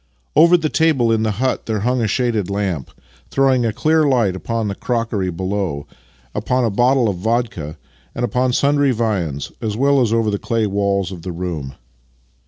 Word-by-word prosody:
Over 170 +3 +7
the 160 -2 -1
table 150 -8 +2
in 110 -1 +2
the 110 -1 0
hut 130 +2 -1
there 110 -2 -1
hung 125 +3 +1
a 110 - +1
shaded 110 -3 0
lamp, 95 -9 -2 0.4
throwing 130 -3 +2
a - - 0
clear 155 +8 +2
light 120 -10 +2
upon 115 +3 -2
the 100 - -2
crockery 115 -4 -2
below, 95 -4 -3 0.5
upon 125 -1 0
a 115 - 0
bottle 125 +3 +3
of 100 -4 -1
vodka, 110 -7 -2 0.4
and 120 - 0
upon 125 +1 0
sundry 145 +2 +2
viands, 100 - -1
as 110 -2 -2
well 140 +1 +3
as 115 -3 +1
over 115 -2 +1
the 100 - -2
clay 115 -2 0
walls 100 -1 0
of 90 -3 -8
the 90 - -5
room. 85 -6 -5
115 Hz, 185 wpm, -19 LUFS, 100-125 Hz, 0.5 s, Over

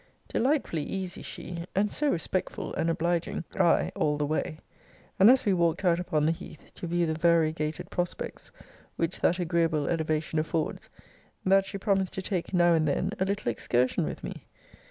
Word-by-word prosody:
Delightfully 255 - +1
easy 185 +3 -4
she, 170 -1 -6
and 205 +2 +1
so 300 -1 +1
respectful 185 -2 -2
and 165 - 0
obliging 170 0 -1 0.2
I, 170 - +3
all 150 -1 +1
the 150 - 0
way, 155 +1 -2 0.6
and 195 +4 +8
as 255 0 +5
we 200 - +3
walked 170 +1 +1
out 170 -1 +4
upon 155 -4 0
the 160 - +3
heath, 160 -2 -9
to 175 - -6
view 175 +1 +1
the 160 - 0
variegated 160 -2 +1
prospects 175 -1 -4 0.4
which 165 +1 -1
that 175 - +2
agreeable 165 -4 +1
elevation 155 -1 0
affords, 160 0 -2 0.6
that 195 +1 +4
she - - -4
promised 195 -2 0
to 190 - -3
take 185 -3 -2
now 175 -2 +4
and 160 -2 +2
then 140 - 0
a 190 - +2
little 195 -10 -1
excursion 125 +2 +1
with - - -5
me. - - -7
170 Hz, 175 wpm, -28 LUFS, 160-185 Hz, 0.6 s, and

